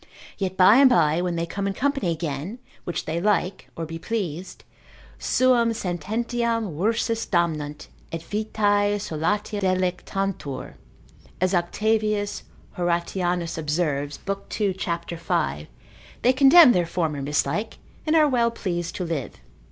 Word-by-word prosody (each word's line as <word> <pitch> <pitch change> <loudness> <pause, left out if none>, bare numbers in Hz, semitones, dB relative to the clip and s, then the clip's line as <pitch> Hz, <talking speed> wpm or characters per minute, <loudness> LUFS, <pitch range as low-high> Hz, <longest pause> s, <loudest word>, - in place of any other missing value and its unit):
Yet 190 -2 -3
by 190 +5 +7
and 275 -1 +7
by 160 -8 +3
when 180 -1 -1
they 170 0 -1
come 200 +3 -3
in 200 - -1
company 275 -7 0
again, 165 - -3 0.3
which 175 - -3
they 165 +2 -2
like, 200 -2 0
or 165 - -4
be 165 +1 -7
pleased, 185 -4 -4 0.6
suam 245 -3 +3
sententiam 225 +2 -2
rursus 225 +5 0
damnant, 155 -5 -1 0.3
et 165 0 -5
vitae 205 0 +1
solatia 205 +3 -2
delectantur, 185 -5 -2 0.7
as 185 +1 +1
Octavius 210 +3 0 0.4
Horatianus 175 0 -1
observes, 150 -2 -1
lib. 195 0 -4
2. 205 -3 0
cap. 170 -2 -3
5, 75 - -2 0.6
they 255 - +5
condemn 275 +2 +8
their 175 -6 +1
former 160 -5 -1
mislike, 145 +9 -1 0.3
and 310 - +3
are 310 -2 +6
well 240 -4 +2
pleased 175 -6 -4
to 185 - -3
live. 160 -6 -3
185 Hz, 130 wpm, -24 LUFS, 165-215 Hz, 0.7 s, condemn